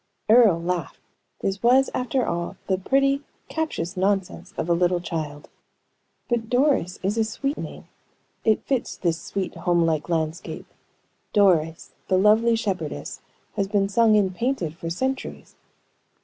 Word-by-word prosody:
Earle 220 Hz, -7 st, +6 dB
laughed. 170 Hz, -2 st, -3 dB, 0.4 s
This 195 Hz, 0 st, -2 dB
was, 255 Hz, +3 st, +4 dB
after 255 Hz, 0 st, 0 dB
all, 170 Hz, 0 st, -3 dB
the 190 Hz, -1 st, 0 dB
pretty, 275 Hz, +6 st, +2 dB, 0.3 s
captious 310 Hz, -, -3 dB
nonsense 195 Hz, 0 st, -1 dB
of -, -, -2 dB
a 170 Hz, -, +3 dB
little 175 Hz, +1 st, +2 dB
child. 155 Hz, -4 st, -5 dB, 0.8 s
"But 230 Hz, -2 st, -1 dB
Doris 250 Hz, -, +2 dB
is 205 Hz, +4 st, 0 dB
a -, -, +4 dB
sweet 275 Hz, +6 st, -2 dB
name. -, -, -8 dB, 0.6 s
It 220 Hz, -1 st, +2 dB
fits 265 Hz, -3 st, -1 dB
this 170 Hz, -2 st, -1 dB
sweet, 195 Hz, -2 st, -4 dB
home 170 Hz, 0 st, +1 dB
like 160 Hz, 0 st, -1 dB
landscape. 160 Hz, 0 st, -2 dB, 0.7 s
Doris, 165 Hz, -5 st, +2 dB, 0.2 s
the 185 Hz, -, +3 dB
lovely 220 Hz, +4 st, +4 dB
shepherdess, 185 Hz, -, -3 dB, 0.3 s
has 195 Hz, -, 0 dB
been 200 Hz, -1 st, +1 dB
sung 220 Hz, +1 st, +4 dB
and 190 Hz, -3 st, +2 dB
painted 230 Hz, -, -1 dB
for 165 Hz, 0 st, -5 dB
centuries." 260 Hz, +10 st, -4 dB
195 Hz, 140 wpm, -24 LUFS, 170-235 Hz, 0.8 s, Earle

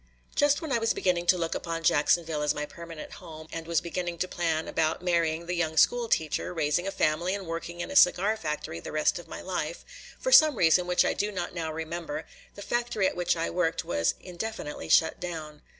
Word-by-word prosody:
Just 290 Hz, +3 st, +2 dB
when 315 Hz, -, -4 dB
I 235 Hz, -, +2 dB
was 225 Hz, 0 st, +1 dB
beginning 175 Hz, -2 st, 0 dB
to 180 Hz, -, +5 dB
look 165 Hz, -1 st, -1 dB
upon 165 Hz, -1 st, -4 dB
Jacksonville 160 Hz, 0 st, +2 dB
as 150 Hz, -, +1 dB
my 150 Hz, -, -2 dB
permanent 165 Hz, 0 st, -9 dB
home 155 Hz, -1 st, -10 dB
and 165 Hz, 0 st, -6 dB
was 170 Hz, -2 st, +1 dB
beginning 175 Hz, 0 st, -4 dB
to 185 Hz, -, -1 dB
plan 165 Hz, -3 st, -1 dB
about 160 Hz, +2 st, 0 dB
marrying 170 Hz, -2 st, +1 dB
the 175 Hz, -, -3 dB
young 160 Hz, -2 st, -1 dB
school 240 Hz, +4 st, +4 dB
teacher, 160 Hz, +2 st, 0 dB
raising 160 Hz, +3 st, 0 dB
a -, -, -1 dB
family, 175 Hz, +1 st, +1 dB
and 200 Hz, -2 st, -6 dB
working 170 Hz, +1 st, -5 dB
in -, -, -5 dB
a -, -, -6 dB
cigar 200 Hz, 0 st, +5 dB
factory 150 Hz, -, -4 dB
the -, -, -8 dB
rest 155 Hz, +2 st, +1 dB
of 175 Hz, -, -12 dB
my -, -, -7 dB
life, 175 Hz, -3 st, -4 dB, 0.3 s
for -, -, -1 dB
some 310 Hz, -, +8 dB
reason, 175 Hz, -1 st, +4 dB
which 180 Hz, 0 st, +3 dB
I -, -, +2 dB
do 210 Hz, +1 st, -1 dB
not 190 Hz, -, -4 dB
now 165 Hz, -3 st, -3 dB
remember, 170 Hz, -, -5 dB, 0.3 s
the -, -, -8 dB
factory 240 Hz, -4 st, 0 dB
at -, -, -3 dB
which 175 Hz, -1 st, +1 dB
I 165 Hz, -, -1 dB
worked 170 Hz, -2 st, 0 dB
was 85 Hz, -1 st, 0 dB
indefinitely 180 Hz, -3 st, -6 dB
shut 160 Hz, -, +4 dB
down. 155 Hz, -4 st, -6 dB
170 Hz, 215 wpm, -28 LUFS, 160-185 Hz, 0.3 s, some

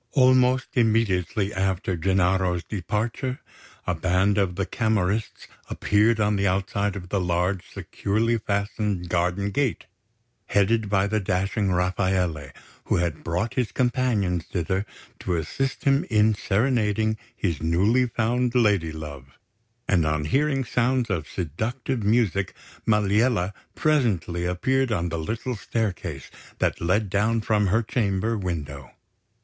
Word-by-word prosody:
Almost 130 Hz, -1 st, +4 dB
immediately 105 Hz, -4 st, +1 dB
after 95 Hz, -1 st, -1 dB
Gennaro's 90 Hz, 0 st, +1 dB
departure, 110 Hz, +7 st, -3 dB, 0.5 s
a 90 Hz, -, 0 dB
band 95 Hz, +4 st, +2 dB
of 95 Hz, -3 st, 0 dB
the 95 Hz, +1 st, -1 dB
Camorrists 110 Hz, +1 st, -1 dB, 0.2 s
appeared 110 Hz, +2 st, +2 dB
on 105 Hz, -1 st, +2 dB
the 100 Hz, 0 st, +1 dB
outside 100 Hz, +2 st, 0 dB
of 90 Hz, -2 st, -7 dB
the 100 Hz, -, 0 dB
large, 90 Hz, +1 st, -1 dB
securely 115 Hz, +3 st, -1 dB
fastened 100 Hz, -3 st, -2 dB
garden 90 Hz, +3 st, 0 dB
gate, 135 Hz, +1 st, -1 dB, 0.6 s
headed 105 Hz, +1 st, +2 dB
by 95 Hz, -1 st, +2 dB
the 110 Hz, +1 st, 0 dB
dashing 95 Hz, +1 st, 0 dB
Rafaele, 90 Hz, -5 st, 0 dB, 0.3 s
who -, -, +1 dB
had 85 Hz, -3 st, -1 dB
brought 90 Hz, +7 st, -1 dB
his 125 Hz, -4 st, -1 dB
companions 115 Hz, -9 st, 0 dB
thither 95 Hz, +3 st, -2 dB, 0.3 s
to 90 Hz, -, -1 dB
assist 130 Hz, -, -2 dB
him 140 Hz, 0 st, +3 dB
in 110 Hz, -1 st, +4 dB
serenading 110 Hz, 0 st, +1 dB, 0.2 s
his 85 Hz, -9 st, -2 dB
newly 100 Hz, +10 st, +2 dB
found 120 Hz, +2 st, 0 dB
lady 100 Hz, -9 st, +3 dB
love; 70 Hz, -4 st, -9 dB, 0.5 s
and 90 Hz, -4 st, +3 dB
on 75 Hz, -1 st, 0 dB
hearing 135 Hz, -, +1 dB
sounds 125 Hz, -1 st, 0 dB
of 80 Hz, -5 st, -2 dB
seductive 115 Hz, -, -3 dB
music, 105 Hz, -3 st, +1 dB, 0.3 s
Maliella 105 Hz, -1 st, +2 dB, 0.2 s
presently 100 Hz, -, +1 dB
appeared 130 Hz, +8 st, +1 dB
on 85 Hz, -5 st, 0 dB
the 85 Hz, 0 st, -3 dB
little 115 Hz, +9 st, -3 dB
staircase 95 Hz, -, -3 dB, 0.3 s
that -, -, 0 dB
led 95 Hz, +5 st, +1 dB
down 105 Hz, +4 st, +1 dB
from 105 Hz, -2 st, +1 dB
her 110 Hz, +5 st, +2 dB
chamber 110 Hz, -1 st, 0 dB
window. 75 Hz, -, -4 dB
100 Hz, 130 wpm, -25 LUFS, 90-115 Hz, 0.6 s, Almost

